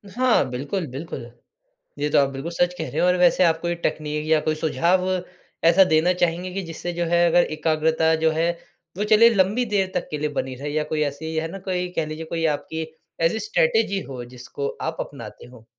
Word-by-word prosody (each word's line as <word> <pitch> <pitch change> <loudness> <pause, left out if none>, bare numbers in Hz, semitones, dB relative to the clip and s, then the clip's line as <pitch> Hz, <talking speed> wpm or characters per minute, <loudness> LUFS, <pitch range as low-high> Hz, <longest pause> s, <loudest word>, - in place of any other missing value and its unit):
हाँ, 250 - +3
बिल्कुल, 145 +8 -3
बिल्कुल। 130 -3 -7 0.7
ये 150 +1 0
तो - - +2
आप 140 -1 +3
बिल्कुल 140 +5 -6
सच 175 +1 +1
कह - - -4
रहे - - -3
हो। 180 - +4
और 180 - +4
वैसे 180 +1 +4
आप 165 -1 +3
कोई 175 0 -1
टेक्नीक 150 0 -2
या 160 -1 +4
कोई 155 - 0
सुझाव 170 +5 +1 0.6
ऐसा 175 +3 +7
देना 160 +3 +3
चाहेंगे 175 +1 -1
कि 195 - -2
जिससे 170 +1 -5
जो 175 0 -1
है, 170 +1 +3
अगर 175 +1 +5
एकाग्रता 160 +1 +2
जो 160 - +4
है 165 +2 +1 0.5
वो 210 - 0
चले 220 +2 +6
लंबी 200 +6 +2
देर 195 -3 0
तक - - -1
के 150 - -2
लिए 150 0 -1
बनी 130 -1 -4
रहे। 145 +3 -5
या 155 +1 0
कोई 155 - 0
ऐसी 160 +3 -4
है 160 +1 -1
ना 195 - -7
कोई 180 0 -1
कह 165 - 0
लीजिए 155 +1 -6
कोई 165 0 -2
आपकी 160 +2 -5 0.4
ऐसी 165 +7 +2
स्ट्रैटेजी 450 - +1
हो 125 -2 -6
जिसको 135 +3 -5
आप - - -3
अपनाते - - -8
हो? 120 -3 -16
165 Hz, 215 wpm, -23 LUFS, 150-180 Hz, 0.7 s, ऐसा